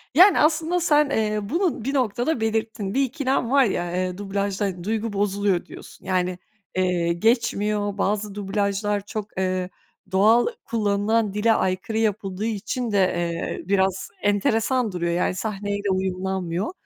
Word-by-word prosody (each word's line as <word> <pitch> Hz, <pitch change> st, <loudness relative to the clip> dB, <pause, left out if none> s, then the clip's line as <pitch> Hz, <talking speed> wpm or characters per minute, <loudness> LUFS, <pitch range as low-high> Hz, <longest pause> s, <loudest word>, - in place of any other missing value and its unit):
yani, 365 Hz, +3 st, +7 dB
aslında 325 Hz, +3 st, +2 dB
sen, 300 Hz, -3 st, +3 dB
eee, 215 Hz, -5 st, 0 dB
bunu 330 Hz, -, -1 dB
bir 275 Hz, -, -1 dB
noktada 245 Hz, +1 st, 0 dB
belirttin, 220 Hz, -2 st, -1 dB
"Bir 275 Hz, -, +3 dB
ikilem 260 Hz, -2 st, -1 dB
var 275 Hz, 0 st, +6 dB
ya, 175 Hz, -4 st, -1 dB
eee, 185 Hz, 0 st, -1 dB
dublajla 200 Hz, -2 st, -2 dB
duygu 220 Hz, +2 st, -2 dB
bozuluyor." 200 Hz, -2 st, 0 dB
diyorsun. -, -, -13 dB
Yani, 185 Hz, -1 st, 0 dB, 0.4 s
eee, 180 Hz, -2 st, +1 dB
geçmiyor, 210 Hz, 0 st, +1 dB
bazı 205 Hz, 0 st, -1 dB
dublajlar 205 Hz, 0 st, -1 dB
çok, 210 Hz, -2 st, -6 dB
ııı, 185 Hz, -1 st, -1 dB, 0.4 s
doğal 215 Hz, +5 st, +5 dB, 0.2 s
kullanılan 210 Hz, -1 st, +1 dB
dile 215 Hz, +2 st, +3 dB
aykırı 190 Hz, +3 st, -1 dB
yapıldığı 210 Hz, -2 st, -1 dB
için 225 Hz, +2 st, -2 dB
de, 200 Hz, -, +1 dB
eee, 175 Hz, -3 st, 0 dB
biraz 190 Hz, -1 st, +1 dB
enteresan 220 Hz, +3 st, +1 dB
duruyor. 170 Hz, -1 st, -1 dB
Yani, 180 Hz, +1 st, 0 dB
sahneyle 205 Hz, 0 st, -3 dB
uyumlanmıyor. 185 Hz, -, -2 dB
205 Hz, 135 wpm, -24 LUFS, 190-225 Hz, 0.4 s, yani